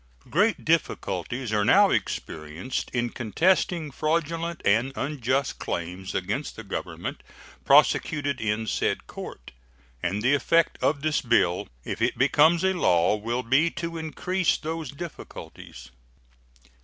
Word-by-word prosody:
Great 210 Hz, +7 st, +2 dB
difficulties 120 Hz, -, -1 dB
are 105 Hz, -1 st, +2 dB
now -, -, +5 dB
experienced 80 Hz, +10 st, -3 dB
in 120 Hz, -1 st, -1 dB
contesting 160 Hz, -, +1 dB
fraudulent 165 Hz, +3 st, -1 dB
and 115 Hz, +6 st, +3 dB
unjust 135 Hz, -1 st, -1 dB
claims 90 Hz, +2 st, -4 dB
against 105 Hz, +10 st, -2 dB
the 115 Hz, -, -8 dB
Government 100 Hz, -, -5 dB, 0.4 s
prosecuted 145 Hz, -4 st, +3 dB
in 110 Hz, +1 st, -1 dB
said -, -, -1 dB
court, -, -, -9 dB, 0.5 s
and 100 Hz, +4 st, -1 dB
the 130 Hz, +3 st, +4 dB
effect 165 Hz, +3 st, +2 dB
of 140 Hz, -1 st, +1 dB
this 155 Hz, -1 st, +1 dB
bill, 105 Hz, -8 st, +2 dB, 0.2 s
if -, -, -4 dB
it -, -, +1 dB
becomes 155 Hz, +6 st, +4 dB
a 190 Hz, 0 st, +3 dB
law, 90 Hz, -, +3 dB
will 115 Hz, +4 st, -2 dB
be 135 Hz, +8 st, +3 dB
to 170 Hz, 0 st, -5 dB
increase 180 Hz, +3 st, 0 dB
those 160 Hz, -2 st, -4 dB
difficulties. 140 Hz, -, -9 dB
135 Hz, 125 wpm, -26 LUFS, 105-160 Hz, 0.5 s, now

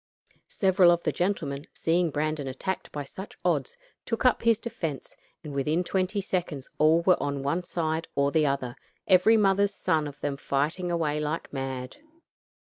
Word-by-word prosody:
Several 190 Hz, -2 st, +4 dB
of 170 Hz, 0 st, +3 dB
the -, -, +1 dB
gentlemen, 160 Hz, -6 st, -2 dB
seeing 170 Hz, +1 st, +1 dB
Brandon 150 Hz, -1 st, -2 dB
attacked 160 Hz, +9 st, -4 dB
by 145 Hz, -, -4 dB
such 190 Hz, +8 st, -9 dB
odds, 480 Hz, +1 st, 0 dB, 0.3 s
took 230 Hz, +2 st, -3 dB
up 255 Hz, -, +4 dB
his 230 Hz, -1 st, +4 dB
defense, 165 Hz, -, -5 dB, 0.3 s
and 150 Hz, -3 st, -7 dB
within 150 Hz, +6 st, 0 dB
twenty 190 Hz, +2 st, -1 dB
seconds 175 Hz, -8 st, -3 dB
all 160 Hz, +2 st, +5 dB
were 180 Hz, 0 st, +4 dB
on 140 Hz, -1 st, -2 dB
one 145 Hz, +6 st, 0 dB
side 165 Hz, -2 st, -2 dB
or 140 Hz, 0 st, +2 dB
the 155 Hz, -1 st, +3 dB
other, 130 Hz, -3 st, -2 dB, 0.3 s
every 195 Hz, +4 st, +6 dB
mother's 200 Hz, -1 st, +3 dB
son 155 Hz, -5 st, 0 dB
of 145 Hz, -, -10 dB
them 140 Hz, -1 st, -2 dB
fighting 150 Hz, +6 st, -1 dB
away 160 Hz, -3 st, 0 dB
like 150 Hz, +1 st, -3 dB
mad. 130 Hz, -2 st, -4 dB
160 Hz, 165 wpm, -27 LUFS, 145-185 Hz, 0.3 s, every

